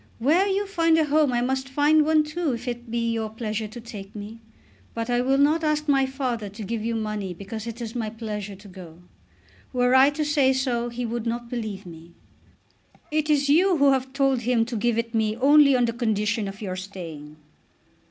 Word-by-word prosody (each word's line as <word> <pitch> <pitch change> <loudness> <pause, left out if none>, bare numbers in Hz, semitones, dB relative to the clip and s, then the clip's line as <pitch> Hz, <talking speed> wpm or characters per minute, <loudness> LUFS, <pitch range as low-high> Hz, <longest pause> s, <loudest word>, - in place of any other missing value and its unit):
Where 320 - +3
you 400 +1 0
find 330 -4 +2
a 315 - +3
home 300 -1 +2
I 240 -1 +1
must 265 +1 -1
find 295 +3 +4
one 310 0 +3
too 300 -1 -2
if 240 +2 -6
it 240 -1 -5
be 230 0 -1
your 220 -1 -2
pleasure 220 -1 -4
to 225 +3 -10
take 210 -4 -10
me. 210 +2 -8 0.6
But 230 +1 -3
I 245 0 +2
will 265 +2 +2
not 300 +4 +3
ask 305 0 0
my 270 -2 +3
father 250 -6 -3
to 210 +3 -9
give 220 +2 -3
you 230 0 -1
money 215 -4 -3
because 205 +4 -7
it 230 +1 -6
is 230 -1 -5
my 225 -3 -3
pleasure 210 -2 -6
to 200 +2 -15
go. 180 -3 -12 0.7
Were 250 0 +2
I 265 +2 +7
to 300 +1 -2
say 285 -3 +3
so 245 -2 -1
he 240 +1 -4
would 235 0 -3
not 235 0 -4
believe 215 -5 -4
me." 170 0 -12 1.0
"It 305 0 0
is 285 -2 +3
you 350 +5 +4
who 280 -1 +5
have 265 0 0
told 270 -2 +1
him 235 -1 +1
to 240 +1 -5
give 230 +1 0
it 230 0 -2
me 220 -1 +1
only 280 +1 +6
on 245 -1 +3
the 230 - -2
condition 220 -2 -1
of 195 +2 -8
your 185 -2 -3
staying." 165 -6 -8
240 Hz, 210 wpm, -24 LUFS, 215-275 Hz, 1.0 s, I